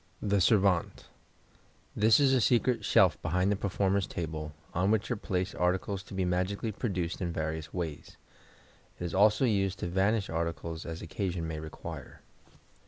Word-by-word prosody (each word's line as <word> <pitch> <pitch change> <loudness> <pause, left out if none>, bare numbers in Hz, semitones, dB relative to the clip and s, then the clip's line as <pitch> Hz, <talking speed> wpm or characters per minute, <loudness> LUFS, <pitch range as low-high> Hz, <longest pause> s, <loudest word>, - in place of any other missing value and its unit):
The 100 -2 +1
Servante.—This 100 - 0
is 135 -2 +4
a 130 - +3
secret 120 +2 +2
shelf - - +4
behind 90 +4 +1
the - - +2
performer's 100 -1 0
table, 80 -2 -4 0.2
on 90 +3 +1
which 110 +2 +1
are - - +1
placed 95 -2 -2
articles 95 +2 0
to 95 - -11
be 95 -1 0
magically 95 +5 -1
produced 95 -6 -3
in 85 -2 -1
various 80 -2 -3
ways. 85 -5 -5 0.8
It - - -5
is 85 - -4
also 105 +6 +4
used 100 -4 +1
to - - -3
vanish 95 +4 +1
articles 80 -1 -4
as 80 0 -6
occasion 85 0 -3
may 80 -1 -4
require. 80 0 -8
95 Hz, 155 wpm, -30 LUFS, 85-100 Hz, 0.8 s, is